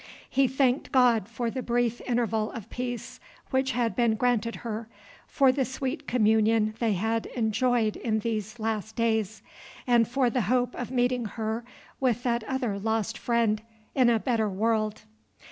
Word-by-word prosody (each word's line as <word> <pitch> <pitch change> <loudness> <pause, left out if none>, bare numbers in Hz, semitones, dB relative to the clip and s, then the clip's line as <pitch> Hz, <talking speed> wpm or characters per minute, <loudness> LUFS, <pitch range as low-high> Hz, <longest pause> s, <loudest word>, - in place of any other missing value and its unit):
He 270 0 +3
thanked 265 +1 +1
God 240 -5 +4
for 235 0 -2
the 260 - -3
brief 240 -1 0
interval 225 -3 0
of 225 -4 -8
peace 245 -2 -5 0.3
which 260 -1 +1
had 230 -4 0
been 235 -1 +2
granted 230 -1 +1
her, 225 0 -4 0.4
for 270 -2 +4
the 265 +1 0
sweet 265 +3 -4
communion 220 -1 +3
they 225 -3 +2
had 220 +4 -1
enjoyed 225 -1 +1
in 220 -2 0
these 215 0 -3
last 220 -1 -3
days, 220 -2 0 0.4
and 235 -3 +4
for 250 0 +1
the 250 - +1
hope 250 -1 +2
of 245 - -5
meeting 250 -1 +1
her 220 +1 -3 0.4
with 245 -3 +1
that 235 -2 0
other 245 -6 -2
lost 220 +1 -1
friend 230 -3 +1 0.3
in 255 -3 +4
a 235 - +4
better 225 -2 0
world. 215 +1 0
230 Hz, 160 wpm, -27 LUFS, 220-245 Hz, 0.4 s, God